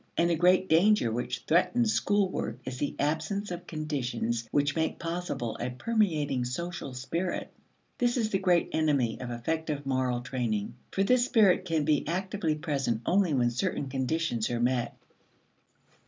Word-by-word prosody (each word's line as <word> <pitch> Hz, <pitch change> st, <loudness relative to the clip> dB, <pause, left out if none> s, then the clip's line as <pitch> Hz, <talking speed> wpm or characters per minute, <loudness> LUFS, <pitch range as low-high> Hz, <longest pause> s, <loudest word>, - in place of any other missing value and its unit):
And 170 Hz, +1 st, +3 dB
the -, -, +3 dB
great 180 Hz, +3 st, +4 dB
danger 170 Hz, -, +4 dB
which 120 Hz, +2 st, -3 dB
threatens 220 Hz, +7 st, +3 dB
school 205 Hz, -1 st, +2 dB
work -, -, -3 dB
is 130 Hz, 0 st, -5 dB
the 145 Hz, -, -2 dB
absence 160 Hz, +7 st, -1 dB
of 175 Hz, 0 st, -6 dB
conditions 120 Hz, -7 st, -2 dB
which 145 Hz, +2 st, +1 dB
make 160 Hz, -1 st, 0 dB
possible 165 Hz, -9 st, -3 dB
a 120 Hz, -, -2 dB
permeating 150 Hz, -, 0 dB
social 140 Hz, +2 st, -4 dB
spirit; 170 Hz, +8 st, -3 dB, 0.5 s
this 245 Hz, 0 st, +2 dB
is 220 Hz, -2 st, 0 dB
the 195 Hz, -, +1 dB
great 180 Hz, -3 st, +2 dB
enemy 140 Hz, -8 st, +1 dB
of 125 Hz, -, -5 dB
effective 145 Hz, +4 st, -3 dB
moral 130 Hz, -2 st, 0 dB
training. 120 Hz, -5 st, -2 dB, 0.2 s
For 195 Hz, -, +1 dB
this 245 Hz, +4 st, +3 dB
spirit 205 Hz, -7 st, +4 dB
can 160 Hz, -4 st, 0 dB
be 150 Hz, -2 st, +1 dB
actively 185 Hz, -1 st, -1 dB
present 140 Hz, -7 st, -1 dB
only 180 Hz, -4 st, +2 dB
when 120 Hz, -2 st, +2 dB
certain 140 Hz, +1 st, -2 dB
conditions 130 Hz, -2 st, -1 dB
are 120 Hz, -1 st, -1 dB
met. 120 Hz, 0 st, 0 dB
155 Hz, 155 wpm, -29 LUFS, 125-180 Hz, 0.5 s, great